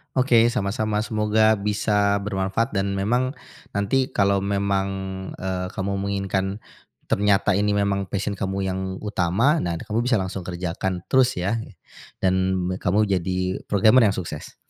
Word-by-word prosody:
Oke, 125 -3 +4
sama-sama. 105 -2 -1
Semoga 110 0 +2
bisa 105 0 +1
bermanfaat 100 +4 -1
dan 100 0 -1
memang 125 +7 0 0.4
nanti 125 +6 +1
kalau 100 0 +3
memang, 100 0 0 0.5
eee, 90 0 -3
kamu 100 +1 -2
menginginkan 100 0 -2 0.4
ternyata 100 0 +2
ini 100 +1 +1
memang 100 -1 0
passion 100 +1 -2
kamu 100 -1 -2
yang 95 0 -2 0.2
utama, 105 - +2
nah 85 -1 -2
nanti - - -6
kamu 110 +1 -2
bisa 125 - +3
langsung 95 -1 -2
kerjakan 90 0 -3
terus, 130 -1 +4
ya, 100 +6 -1 0.6
dan 95 -1 +3 0.4
kamu 95 +4 +1 0.2
jadi 90 +1 -2
programmer 110 +4 +5
yang 100 - 0
sukses. 80 -5 -6
100 Hz, 140 wpm, -23 LUFS, 95-110 Hz, 0.6 s, programmer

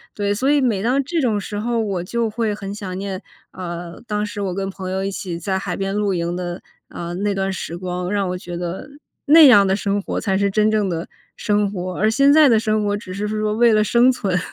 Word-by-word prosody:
对， 205 -1 0
所 255 +7 0
以 290 -1 +4
每 225 -7 +1
当 255 +6 +1
这 330 +5 -2
种 235 -7 +1
时 205 +1 -5
候 230 +1 0
我 195 -5 -2
就 230 +5 -1
会 220 -1 -1
很 200 -1 -6
想 190 -3 -6
念， 195 -1 -4 0.3
啊， 175 -1 -6 0.2
当 210 -1 -1
时 205 0 -7
我 190 -3 -2
跟 195 0 -2
朋 190 -1 -6
友 190 +1 -2
一 195 - -2
起 180 -3 -5
在 190 +3 -2
海 180 -2 -4
边 195 0 -3
露 205 -1 0
营 170 -1 -2
的， 175 0 -5 0.3
啊， 170 0 -6
那 200 +3 -1
段 195 0 -1
时 170 -2 -5
光， 180 0 -4
让 200 -2 0
我 180 - -3
觉 175 -1 -8
得 175 +9 -5 0.4
那 310 +1 +8
样 205 -6 +7
的 190 - +2
生 200 0 -1
活 - - -4
才 190 -1 0
是 200 0 +1
真 215 +2 +2
正 215 -2 +1
的 170 -1 -4 0.3
生 205 -1 0
活， 185 -2 -5
而 215 +2 +2
现 275 +5 +4
在 305 0 +7
的 230 -4 +5
生 215 -1 0
活 205 0 0
只 205 -3 -7
是 205 +2 -3
说 215 0 -1
为 230 +1 +4
了 215 0 +4
生 235 +4 +4
存。 195 -8 0
200 Hz, 265 characters per minute, -20 LUFS, 185-215 Hz, 0.4 s, 那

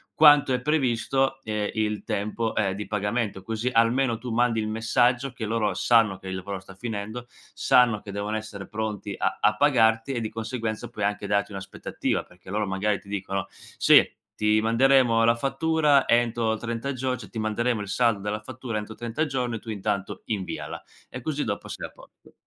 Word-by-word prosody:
quanto 145 -3 +7
è 125 - 0
previsto, 135 -1 +1
ehm, 105 -1 -2
il 105 -1 -1
tempo, 110 +2 -2
ehm, 95 -3 +1
di 105 +1 -6
pagamento; 105 -1 -2
così 115 +3 -2
almeno 115 +1 +3
tu 120 0 -6
mandi 115 -1 +2
il 110 - -2
messaggio 120 +3 +1
che 110 - -5
loro 105 -3 0
sanno 110 -2 +3
che 95 - -8
il 95 - -3
lavoro 95 +1 -5
sta 95 +1 -13
finendo, 110 +2 -5 0.3
sanno 120 -4 +4
che 100 - -9
devono 105 +2 -2
essere 100 -3 -7
pronti 105 -2 -4
a - - 0
a 105 0 +4
pagarti 115 -3 +3
e 120 - -1
di 110 - -3
conseguenza 115 0 -4
puoi 105 -4 -3
anche 105 0 -2
darti 100 0 0
un'aspettativa, 95 -1 -3
perché 90 +1 -17
loro 105 +2 0
magari 100 +2 0
ti 100 - -17
dicono: 95 -1 -3 0.3
"Sì, - - +7 0.3
ti 105 0 +3
manderemo 115 0 +4
la 115 0 +4
fattura 145 +1 +2
entro 115 -2 +2
30 115 +4 -3
gior 130 -1 -2
cioè - - -11
ti 115 - -6
manderemo 110 +2 0
il 100 - -5
saldo 115 +1 +2
della 105 +1 -3
fattura 125 -1 -5
entro 105 +1 -6
30 120 +7 -2
giorni", 125 -6 -2
tu 115 - -11
intanto 100 -2 -3
inviala, 100 -4 -4 0.3
e 125 - -7
così 150 +1 -2
dopo - - -4
sei - - -6
a - - -20
posto. - - -19
110 Hz, 185 wpm, -26 LUFS, 105-125 Hz, 0.3 s, quanto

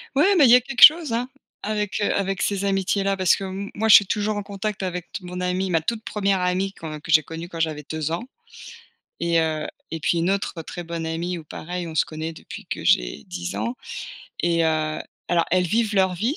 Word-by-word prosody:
Ouais 380 +8 +4
mais 295 -6 +6
il - - +6
y - - +10
a 250 - +5
quelque 265 +1 +2
chose, 310 -5 +8
hein, 245 +2 -1 0.3
avec, 210 -1 -2
heu, 205 - +2
avec 195 -1 -1
ces 200 -1 0
amitiés-là 195 0 +1
parce 185 -2 +3
que 195 - -6
m 195 +1 -5
moi, 220 +1 0
je - - +11
suis 205 - +7
toujours 210 0 -1
en 205 - -3
contact 200 +1 -4
avec 180 -2 -4
t 190 - -6
mon 180 0 -6
amie, 180 +1 -1
ma 165 -3 +2
toute 220 +7 -3
1re 200 -3 0
amie 185 +2 0
quand 155 -2 -7
que 160 - -6
j'ai 155 -1 +7
connue 165 +3 -7
quand 165 -2 -8
j'avais 155 -3 -2
2 155 0 -2
ans. 170 +7 -2 1.0
Et 170 -1 +2
heu 155 -1 -1 0.2
et 165 - -4
puis 170 +3 +1
une 170 +2 +1
autre 195 -4 -2
très 175 +2 -7
bonne 170 -1 -5
amie 170 +2 -3
où, - - -11
pareil, 175 +3 -6
on 160 - -8
se - - +3
connaît 155 +1 -5
depuis - - -10
que - - -5
j'ai - - +2
10 90 +1 -5
ans. 110 +4 -2 0.7
Et 170 -1 +2
heu, 155 -1 0 0.3
alors, 170 -1 +2
elles 180 +1 +3
vivent 220 +3 0
leur 190 -2 +3
vie, 230 - -1
180 Hz, 235 wpm, -23 LUFS, 160-200 Hz, 1.0 s, je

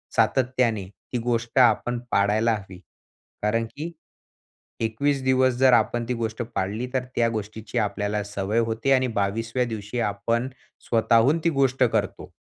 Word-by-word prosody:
सातत्याने 125 -5 +1 0.3
ती - - +1
गोष्ट 120 +1 0
आपण 120 0 +3
पाळायला 105 +3 +2
हवी. 95 -3 -9 0.6
कारण 115 +2 +1
की 160 +4 -5 0.9
21 135 +5 0
दिवस 130 0 +3
जर 130 0 +5
आपण 120 +1 +2
ती 125 - 0
गोष्ट 115 0 -3
पाळली, 105 +6 -2
तर 130 - 0
त्या 115 - +3
गोष्टीची 110 +1 -5
आपल्याला 105 0 -1
सवय 100 +2 -1
होते 115 +3 0
आणि 130 -1 +3
22व्या 115 +5 -1
दिवशी 110 0 -5
आपण 115 +3 -1 0.4
स्वतःहून 115 +6 +3
ती 170 - +3
गोष्ट 135 -1 +3
करतो. - - -1
115 Hz, 140 wpm, -24 LUFS, 105-125 Hz, 0.9 s, जर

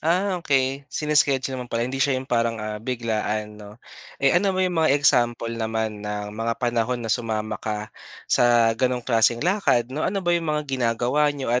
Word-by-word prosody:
ah, 180 +3 0
okey 135 -1 0
sine-schedule 135 -4 +1
mo 125 - -8
pala, 115 +1 -1
hindi 135 +2 -4
siya 135 -1 +2
yung 130 - -4
parang, 115 -2 0
ah, 105 0 -5
biglaan, 110 -3 -3
'no? 105 +1 -12 0.4
Eh, 140 - +2
ano 190 +2 +2
ba 185 - +2
yung 175 -3 0
mga 155 - +3
example 120 -4 +2
naman 110 -2 -3
ng 105 0 -5
mga 115 +1 -2
panahon 120 0 0
na 110 - 0
sumama 110 -3 -2
ka 105 0 -4 0.3
sa 120 -2 +4
ganong 125 +1 -1
klaseng 115 +2 +3
lakad, 130 - +1
'no? 150 - -3
Ano 195 +2 -1
ba 175 - +2
'yong 170 -2 0
mga 150 0 0
ginagawa 130 +2 +1
niyo 135 -5 -3
at 125 - +2
120 Hz, 190 wpm, -23 LUFS, 115-145 Hz, 0.4 s, sa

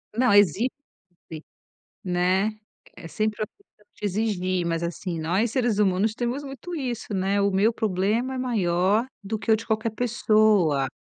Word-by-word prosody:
Não, 250 -2 +3
exigir, 205 - +4 1.4
né. 185 +3 +1 0.5
É 165 - -10
sempre 215 +2 -2
a - - -1
pessoa 300 - -32
quer - - -10
exigir, 185 -3 -1
mas, 165 0 -1
assim, 170 0 -4
nós, 190 +9 0
seres 240 -5 +1
humanos, 205 +2 +2
temos 245 +4 -2
muito 275 +6 -8
isso, 245 -7 -4
né, 195 +2 +1
o 200 0 +2
meu 205 +4 +3
problema 220 +5 0
é - - -4
maior 205 -2 +1 0.2
do 215 +2 -3
que 220 - +1
o - - +5
de 225 - -8
qualquer 220 +1 0
pessoa. 215 - +2
210 Hz, 160 wpm, -25 LUFS, 185-230 Hz, 1.4 s, o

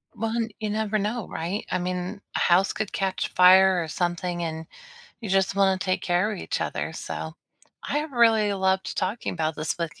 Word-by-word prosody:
Well, 225 +1 -2 0.3
you 215 -1 -2
never 215 0 0
know, 210 +2 -2
right? 175 +6 -4
I - - +1
mean, 180 +3 -4
a - - +1
house 180 +3 +3
could 215 -2 -3
catch 190 -2 -1
fire 185 0 +6
or - - -6
something, 175 +1 -2
and 160 0 -4 0.6
you 215 - -6
just 195 0 +2
wanna 190 -1 +3
take 185 0 -1
care 180 +4 +1
of 195 - -5
each - - -3
other, - - -3
so - - -6 0.5
I 295 - +1
have 300 -1 -4
really 225 -4 +4
loved 190 -1 0
talking 200 +5 -2
about 160 -2 -1
this 155 +2 -3
with 170 -1 -4
190 Hz, 190 wpm, -25 LUFS, 175-210 Hz, 0.6 s, fire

